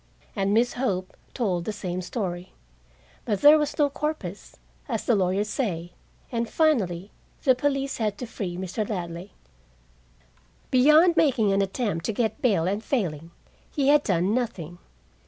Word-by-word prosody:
And 195 -1 0
Miss 235 +3 +2
Hope 195 -8 -2 0.2
told 185 -9 0
the - - -2
same 185 -3 -4
story. 180 -2 -4 0.7
But 205 -4 -2
there 300 +2 +8
was 295 -1 -2
no 295 -2 +4
corpus, 280 - -5 0.3
as 225 -4 -2
the 240 - +3
lawyers 195 +2 +1
say, 180 -7 -3 0.4
and 230 -2 -2
finally 205 - +1 0.3
the 260 - +5
police 275 +1 -1
had 210 -3 -1
to 250 - -5
free 190 -6 -5
Mr. 190 +3 -3
Ladley. 175 -1 -5 1.4
Beyond 305 +7 +5
making 235 -9 +3
an 195 - +2
attempt 195 -3 -2
to 220 - -1
get 220 0 -1
bail, 200 -10 +2
and 200 +3 -1
failing, 165 - -2 0.4
he 280 -3 +1
had 295 0 +6
done 185 -3 +1
nothing. 175 -9 -3
210 Hz, 150 wpm, -25 LUFS, 185-255 Hz, 1.4 s, there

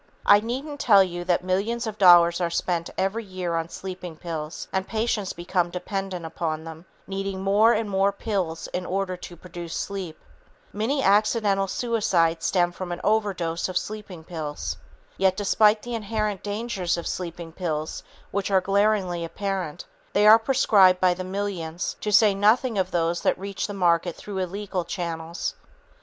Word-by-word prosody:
I 205 - +7
needn't 265 +7 -5
tell 200 -7 +6
you 175 -1 -4
that 175 -1 +1
millions 205 +6 -1
of 215 -1 -5
dollars 175 -2 +7
are 170 - +1
spent 170 0 -1
every 195 +5 -1
year 185 -4 -4
on 165 0 -2
sleeping 180 -2 -7
pills 160 -2 -6
and 190 0 -1
patients 220 -3 -1
become 175 0 -1
dependent 185 0 -4
upon 160 -1 -3
them, 165 +1 -10 0.2
needing 195 0 -4
more 210 +4 +5
and 220 0 -1
more 195 0 +2
pills 195 -6 -3
in 180 - -2
order 190 0 -1
to 175 - -9
produce 175 -1 -8
sleep. 190 -5 -4 0.6
Many 265 +7 0
accidental 205 -1 +3
suicides 185 -8 +1
stem 175 -2 +2
from 180 0 -6
an 175 - -4
overdose 190 -6 0
of 185 - -1
sleeping 205 -6 -5
pills. 155 -3 -5 0.4
Yet, 190 -1 +2
despite 210 +1 +3
the 245 - -5
inherent 215 -3 -2
dangers 205 -4 -2
of 170 - -5
sleeping 170 -2 -5
pills 160 -3 -3 0.3
which 200 0 -1
are 195 -1 +4
glaringly 195 -2 +1
apparent, 180 -1 -4 0.3
they 205 - +4
are 220 +1 +9
prescribed 200 -7 +4
by 185 -1 +4
the 185 +1 -5
millions, 185 -3 -3
to 210 - -2
say 210 0 +6
nothing 220 +5 +3
of 185 -1 0
those 170 -1 0
that - - +1
reach 195 +1 -4
the 205 - -6
market 175 -2 +2
through 200 -2 -6
illegal 185 0 -3
channels. 170 -1 -4
190 Hz, 165 wpm, -25 LUFS, 175-205 Hz, 0.6 s, are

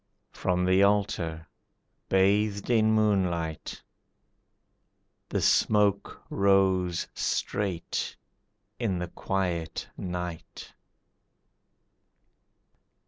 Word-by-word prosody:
From 90 0 0
the 95 +1 +4
altar, 100 -6 +1 0.6
bathed 100 +3 +2
in 110 -2 +4
moonlight, 90 -7 0 1.5
The - - -1
smoke 105 -2 +2
rose 95 -3 +2
straight 95 -5 -2 0.6
in 105 -7 0
the 90 -1 -4
quiet 90 -4 -3
night. 90 -2 -6
95 Hz, 65 wpm, -28 LUFS, 90-100 Hz, 1.5 s, the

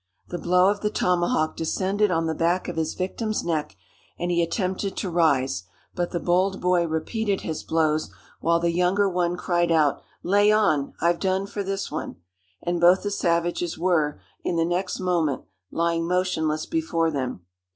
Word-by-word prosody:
The 175 - -4
blow 180 +2 +4
of 205 - -4
the 210 - +1
tomahawk 175 -5 +1
descended 195 +5 0
on 165 -2 +1
the 160 - 0
back 170 +3 0
of 175 - -4
his 160 -1 -2
victim's 215 +4 -2
neck, 155 - -2 0.4
and 175 0 -2
he 170 0 +2
attempted 185 +3 -2
to 185 - -2
rise; 135 - +2 0.3
but 175 -1 -1
the 175 - -2
bold 185 +3 +1
boy 180 -1 +2
repeated 195 +6 -1
his 160 - -4
blows, 155 -1 +1 0.3
while 170 0 +2
the 170 0 +1
younger 180 +4 +2
one 175 -1 0
cried 175 -1 +1
out, 155 -3 +3 0.2
"Lay 205 +3 +4
on!—I've 170 -4 +1
done 190 0 0
for 205 +1 -5
this 195 0 -3
one!" 155 - -4 0.5
and 175 0 -1
both 180 +2 +6
the 205 - -2
savages 170 -2 0
were, 160 -4 +1 0.2
in 175 - -1
the 165 0 +2
next 180 +2 -1
moment, 170 -7 0 0.3
lying 170 0 0
motionless 160 -4 0
before 170 - 0
them. 130 - -3
175 Hz, 170 wpm, -24 LUFS, 165-185 Hz, 0.5 s, both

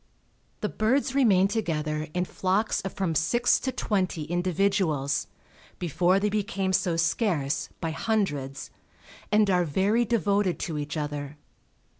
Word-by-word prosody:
The 210 - -1
birds 255 +4 +1
remain 205 -9 +4
together 155 -7 -2
in 180 0 +1
flocks 195 +4 0
of 195 - -5
from 185 -4 -1
six 235 +11 +2
to 260 - -2
twenty 190 -9 -1
individuals 175 -3 0 0.5
(before 175 +3 +2
they 210 +1 +1
became 200 -2 -1
so 175 -3 +1
scarce, 160 - 0
by 165 - -2
hundreds), 155 -8 -2 0.6
and 210 0 +4
are 180 -1 +3
very 195 +9 +2
devoted 205 -5 +1
to 155 -3 -3
each 145 +1 -4
other. 145 -1 -4
185 Hz, 130 wpm, -27 LUFS, 155-210 Hz, 0.6 s, remain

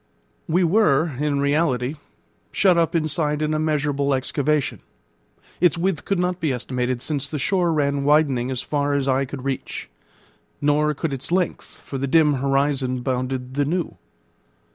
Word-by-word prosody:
We 175 +3 +2
were 165 - +3
in 145 -1 0
reality 140 -2 +1 0.5
shut 190 -3 +4
up 170 0 +1
inside 155 -1 0
an 155 0 0
immeasurable 145 -2 0
excavation. 145 +2 0 0.8
Its 175 -1 +3
width 180 -2 -1
could 195 - 0
not 180 0 -1
be 160 -5 0
estimated, 125 0 -2
since 145 -2 -2
the 155 - -3
shore 175 +3 +1
ran 140 -2 0
widening 140 -4 +3
as 130 -1 -2
far 145 -1 0
as 140 -1 0
eye 135 0 +2
could 135 -1 -8
reach, 135 - -4 0.7
nor 150 +1 +2
could 150 0 -3
its 135 +4 -5
length, 180 -1 -2
for 135 - -5
the 140 - -1
dim 150 +1 +4
horizon 135 -2 0
bounded 130 0 -3
the 145 +1 +1
new. 170 +4 -2
145 Hz, 155 wpm, -22 LUFS, 135-160 Hz, 0.8 s, shut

